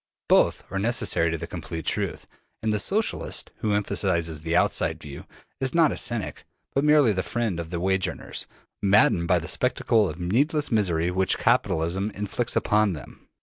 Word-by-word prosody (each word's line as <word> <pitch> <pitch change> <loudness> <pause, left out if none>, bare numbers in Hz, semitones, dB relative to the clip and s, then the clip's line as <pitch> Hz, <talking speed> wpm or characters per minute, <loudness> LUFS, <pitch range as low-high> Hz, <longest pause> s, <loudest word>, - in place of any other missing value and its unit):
Both - - +3
are 95 - -2
necessary 100 -6 +1
to 80 - -2
the - - -5
complete 80 -1 -7
truth; - - -2 0.4
and 110 -1 +1
the 105 - 0
Socialist, 210 - 0
who 105 -2 -1
emphasizes 85 -6 -1
the 80 +1 -2
outside - - +1
view, 70 -2 -10 0.3
is 130 +1 -2
not 165 -3 +5
a - - -3
cynic, 120 -4 -2 0.3
but 140 - +1
merely 150 -7 +5
the 95 - -1
friend 95 +1 -2
of 85 -1 -5
the 85 -1 -3
wage 95 +1 +1
earners, - - -6 0.3
maddened 95 -4 +4
by 90 - +4
the 85 0 -4
spectacle 115 -4 +1
of 75 - -7
the 90 - -6
needless 145 - +1
misery 90 -6 +1
which 95 +1 +1
capitalism 95 -5 +1
inflicts 105 +4 -2
upon 105 -2 +2
them. 75 -5 -11
100 Hz, 180 wpm, -25 LUFS, 85-120 Hz, 0.4 s, not